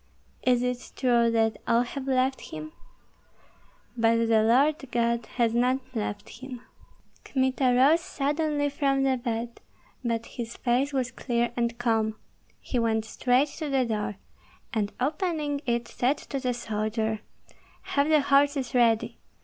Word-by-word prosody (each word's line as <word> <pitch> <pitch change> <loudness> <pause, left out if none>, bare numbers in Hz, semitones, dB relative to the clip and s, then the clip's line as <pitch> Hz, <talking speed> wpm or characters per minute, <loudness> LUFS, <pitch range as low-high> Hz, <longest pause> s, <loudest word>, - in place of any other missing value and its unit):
"Is 250 -1 +2
it 250 0 -3
true 240 -3 +3
that 225 -1 +1
all 235 +1 +4
have 265 +2 -6
left 265 0 +1
him?" 155 0 -7 1.2
"But 230 0 +3
the 220 -1 +5
Lord 265 +7 +4
God 235 0 0
has 230 -2 +2
not 250 +2 +3 0.2
left 210 -2 -3
him." 255 -2 -7 0.6
Kmita 260 0 0
rose 295 +6 +5
suddenly 295 0 -1
from 275 -1 +1
the 265 -1 +2
bed, 235 -1 -4 0.4
but 230 -1 -1
his 235 -1 -7
face 255 +3 +1
was 255 -3 -1
clear 240 -1 -1
and 235 -1 -1
calm; 225 -2 +1 0.4
he 250 - -2
went 220 -1 +1
straight 255 +5 +2
to 310 -2 -3
the 265 -2 +2
door, 210 -2 -2 0.6
and 210 -2 0
opening 300 0 -1
it 235 0 0
said 265 +4 0
to 275 - -5
the 250 -2 -1
soldier, 220 -1 -2 0.7
"Have 285 +2 +2
the 305 -2 +5
horses 280 -2 +2
ready! 230 -3 +2
245 Hz, 140 wpm, -27 LUFS, 230-275 Hz, 1.2 s, the